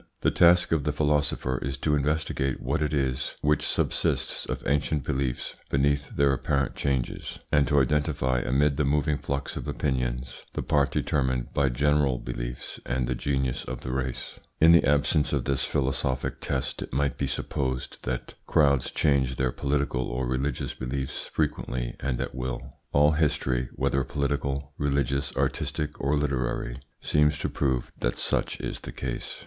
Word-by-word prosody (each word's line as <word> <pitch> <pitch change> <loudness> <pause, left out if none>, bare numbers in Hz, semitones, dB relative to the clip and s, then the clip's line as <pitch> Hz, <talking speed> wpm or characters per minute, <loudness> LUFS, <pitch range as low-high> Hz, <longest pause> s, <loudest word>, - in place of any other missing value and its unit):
The - - +3
task 85 0 +5
of 80 -4 +2
the 75 - +1
philosopher 75 -3 +1
is 65 +1 -3
to 75 +2 0
investigate 75 -2 0
what - - -1
it 75 -1 +1
is 65 -3 -1
which 75 -1 +2
subsists - - 0
of - - -4
ancient 75 +1 +1
beliefs 65 -2 -2 0.2
beneath 70 +1 +1
their 70 -1 +4
apparent 70 +1 0
changes, 65 -3 -2
and 70 -3 +4
to 75 +2 +4
identify 70 -2 +1
amid 70 +4 +2
the 75 - +2
moving 70 +1 +1
flux 70 0 -3
of - - -5
opinions 65 -2 -2
the - - -2
part 70 -2 +3
determined 65 -3 0
by 70 -1 +3
general 70 +1 +2
beliefs - - -5
and 65 0 -1
the 60 - 0
genius 65 0 -1
of - - -6
the 65 - -4
race. 65 -1 -3 0.2
In 80 +1 +8
the 85 - +7
absence 75 +2 +2
of 65 -4 0
this 70 -1 +1
philosophic 65 -1 -1
test 65 - -2
it - - -6
might 70 +2 +1
be 70 - -1
supposed 65 -1 -3
that - - -3
crowds 70 -4 +3
change 65 -3 +2
their 65 -1 +1
political 70 -2 0
or 60 +2 -2
religious 65 +2 -1
beliefs 65 +1 -4
frequently 60 -5 -2
and 65 -3 -1
at - - -3
will. 65 -1 -4 0.2
All 75 +1 +5
history, 65 -5 +1
whether 70 0 +1
political, 70 0 -2
religious, 70 -1 0
artistic, 75 -1 -1
or 70 +2 +2
literary, 65 -4 -1 0.3
seems 75 0 +3
to - - -2
prove 65 -4 0
that - - 0
such - - 0
is - - -4
the - - -8
case. - - -4
70 Hz, 165 wpm, -27 LUFS, 65-75 Hz, 0.3 s, In